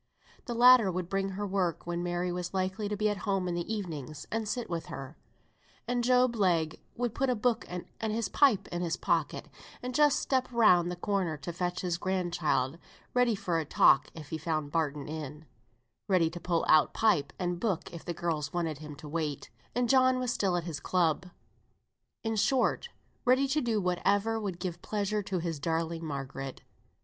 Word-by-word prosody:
The 240 - -4
latter 240 -4 +7
would 180 -1 -3
bring 195 0 0
her 200 +2 -3
work 185 -4 -1
when 175 0 -2
Mary 175 0 -1
was 180 +1 -4
likely 190 +3 -1
to 210 - -2
be 215 +1 +2
at 205 -1 0
home 195 -1 -1
in 175 - -1
the 175 +4 -3
evenings 155 - -5
and 225 -1 -1
sit 245 +1 -2
with 170 -2 -4
her; 135 +3 -7 0.7
and 245 0 0
Job 250 0 +4
Legh 170 -7 +1 0.2
would 240 -2 -1
put 270 -1 0
a 250 - +2
book 235 +1 0
and 180 0 -5 0.2
his 220 +1 -1
pipe 270 -9 +3
in 175 - -3
his 170 -1 -1
pocket - - 0 0.4
and 250 0 -3
just 295 +1 +4
step 260 -1 0
round 180 -7 +5
the 180 - -3
corner 180 -4 -1
to 150 +4 -6
fetch 180 +1 -2
his 175 -2 -1
grand 185 -3 -1
child, 145 -2 0 0.3
ready 245 -3 +3
for 175 -4 -1
a - - -1
talk - - +5
if 155 -3 -9
he 160 - -3
found 155 -2 -2
Barton 150 -3 -1
in; 150 0 -6 0.6
ready 180 -5 +3
to 175 - -7
pull 170 -1 0
out 155 -1 +5
pipe 180 - +2
and 175 -1 -2
book 190 -5 -2
if 170 - -8
the 175 - -4
girls 160 -3 -2
wanted 165 -4 -2
him 150 -1 -8
to 150 - -10
wait, 150 -2 -3 0.2
and 245 0 +2
John 255 0 +5
was 250 -1 -1
still 190 -3 +1
at 175 - -2
his 160 -4 -5
club. 180 -1 +1 1.0
In 225 0 -1
short, 265 - +2 0.3
ready 260 +2 +4
to 300 +3 +2
do 230 -3 +1
whatever 205 +4 +1
would 195 -5 -4
give 175 -2 -4
pleasure 210 0 -1
to 195 -2 -3
his 165 -3 -3
darling 165 +1 -1
Margaret. 135 -3 -5
180 Hz, 195 wpm, -30 LUFS, 165-220 Hz, 1.0 s, latter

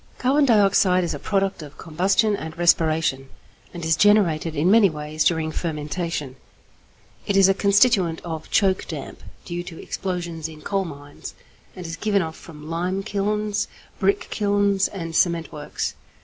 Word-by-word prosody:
= - - -30
Carbon 280 +3 +3
dioxide 195 -5 +4
is 170 - -2
a 145 - -6
product 195 -1 -1
of 150 -1 -11
combustion 195 +7 +1
and 160 -3 -7
respiration, 155 -5 +2 0.4
and 170 -2 -7
is 160 -1 +3
generated 170 -5 +3
in 160 +6 +2
many 215 -2 +6
ways 155 0 -3
during 160 -2 +1
fermentation. 150 -3 -4 0.9
It 200 - +1
is 195 -1 +7
a 195 - +4
constituent 200 -4 +3
of 160 -2 -6
choke 190 -3 +2
damp 150 -5 -7 0.2
due 175 0 -4
to 175 -2 -10
explosions 170 -4 -4
in 155 -1 -13
coal 195 -1 -1
mines, 145 -3 -10 0.4
and 180 - -8
is 165 0 -5
given 200 0 +1
off 160 0 -6
from 150 -2 -12
lime 180 +4 -2
kilns, 210 +1 -1 0.3
brick 400 0 +2
kilns, 200 -1 +1
and 165 -4 -6
cement 170 -2 +1
works. 150 0 -4
175 Hz, 160 wpm, -23 LUFS, 160-200 Hz, 0.9 s, is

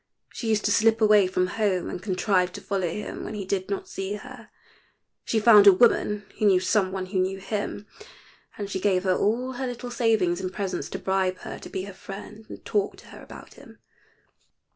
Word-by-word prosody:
She 230 - -4
used 215 -1 +1
to 205 - +2
slip 225 +2 +3
away 210 -3 +5
from 185 0 0 0.2
home 190 -4 +1
and - - -6
contrive 185 -2 +1
to - - -8
follow 190 -4 -2
him 210 +5 -6
when 215 - -6
he 200 -2 -5
did 190 0 -2
not 200 - -3
see 195 +1 -4
her. 250 0 -11 0.8
She 225 - +1
found 210 -2 +7
a - - +12
woman 210 -1 +2
who 215 - +1
knew 190 -2 +5
some 190 0 +1
one 190 -1 -3
who 185 0 -2
knew 190 +1 0
him, 205 +1 -4 0.7
and 205 - -4
she 190 -1 -3
gave 185 -1 +1
her 185 -1 +2
all 240 +7 0
her 260 +1 -4
little 245 0 -6
savings 215 -7 +1
in 185 - -2
presents 195 0 -4
to - - -4
bribe 190 -1 0
her - - -7
to - - -10
be 185 - -4
her 200 0 -8
friend 210 +3 -10
and - - -11
talk 205 -2 -1
to - - -16
her - - -12
about - - -12
him. - - -16
200 Hz, 210 wpm, -25 LUFS, 185-215 Hz, 0.8 s, a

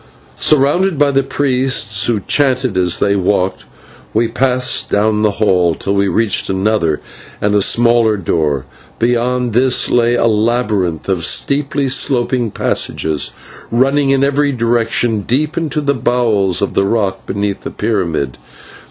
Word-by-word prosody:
Surrounded 155 +5 +2
by 145 0 +3
the 135 0 +2
priests, 130 -7 0
who 115 -4 0
chanted 130 -3 0
as 90 -2 +1
they 100 0 +1
walked, 95 -1 -1 0.5
we 115 +1 +2
passed 125 +2 0
down 105 +1 +1
the 105 -1 +1
hall 90 -6 +2
till 100 - -3
we 100 0 +1
reached 110 +1 0
another 95 -5 0 0.4
and 105 0 0
a 105 - +3
smaller 115 0 +2
door. 75 -7 -1 0.3
Beyond 120 0 0
this 125 +2 +2
lay 120 0 +2
a 120 - +1
labyrinth 105 -6 0
of 95 -4 -1
steeply 140 - 0
sloping 125 -2 +1
passages, 80 -5 -1 0.4
running 135 +4 +1
in 135 0 +2
every 140 +1 +1
direction 115 -2 0
deep 140 - -1
into 155 -2 -2
the 140 -1 0
bowels 110 -7 0
of 100 - -2
the 100 - +1
rock 100 -3 -2
beneath 100 0 -3
the - - -6
pyramid. 85 - -2
115 Hz, 145 wpm, -15 LUFS, 100-130 Hz, 0.5 s, by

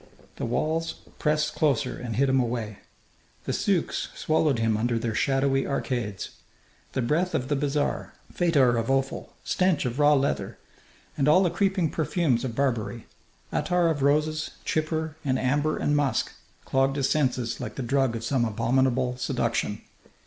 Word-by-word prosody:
The - - -3
walls 160 +7 -1 0.2
pressed 150 0 +1
closer 145 -7 +1
and 120 -3 -5
hid 140 +3 +3
him 135 0 +3
away. 115 -4 -2 0.7
The - - -1
souks - - 0
swallowed 155 -4 +1
him 115 -1 +1
under 115 +2 0
their 115 0 -2
shadowy 135 +2 +1
arcades. 120 -7 -3 0.6
The 130 - 0
breath 165 +9 +1
of 130 +1 -2
the 145 - +2
bazaar, 145 +1 -1 0.2
fetor 140 -9 +3
of 115 - -3
offal, 135 0 -1
stench 180 -6 +1
of 125 +3 -3
raw 150 0 +6
leather, 140 0 -1 0.6
and 140 - +1
all 185 +6 +6
the 175 - +1
creeping 190 -5 +1
perfumes 155 -6 0
of 120 -4 -3
Barbary, 120 -4 -1 0.5
attar 175 -1 +2
of 150 -3 -1
roses, 150 +2 +1 0.2
chypre 155 0 -1
and 130 -3 +1
amber 145 +4 +1
and 145 - +1
musk, 145 -2 +1 0.3
clogged 135 +1 +1
his 135 -2 +1
senses 125 -5 0
like - - -5
the 135 - -3
drug 135 -1 +1
of 115 - -5
some 125 +1 +1
abominable 125 +3 +1
seduction. 130 - -1
135 Hz, 155 wpm, -26 LUFS, 120-150 Hz, 0.7 s, raw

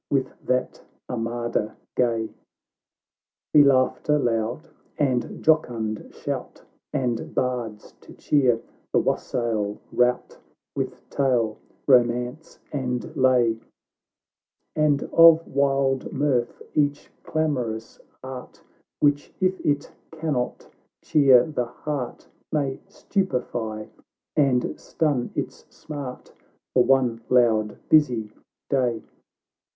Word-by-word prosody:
With 135 -2 0
that 125 0 0 0.3
armada 120 -2 -2 0.2
gay 115 -3 +1 1.2
Ee 150 - +10
laughter 140 +2 +3
loud 120 +3 -1 0.3
and 130 -4 -1
jocund 120 -9 +1
shout, - - -5 0.3
And 120 -3 -2
bards 120 -4 -2
to - - -14
cheer 130 -6 +2 0.3
the - - +2
wassail 110 -4 0
rout, 125 0 +1 0.4
W - - 0
ith - - -24
tale, 120 -6 +1 0.3
romance, 125 +3 +2
and 130 +2 -3
lay; 125 -4 +3 1.2
And 150 -2 +2
of 165 0 +7
wild 135 -1 +1
mirth 130 -4 0
each 145 -1 0
clamorous 125 -8 -2 0.2
art, 130 -1 -9 0.4
Which, 145 0 +2
if 185 0 0
it 145 -1 0 0.2
cannot 155 -6 -3 0.4
cheer 135 -5 +6
the 145 -6 -2
heart, 130 +1 -5 0.2
May 140 -3 0
stupify 125 - -2 0.5
and 135 -4 +2
stun 145 -6 -1
its - - -5
smart, 140 -4 -8 0.4
For 125 - +5
one 125 -4 +2
loud 110 -4 +3
busy 120 -9 +3 0.4
day. 125 -5 0
125 Hz, 95 wpm, -24 LUFS, 120-145 Hz, 1.2 s, Ee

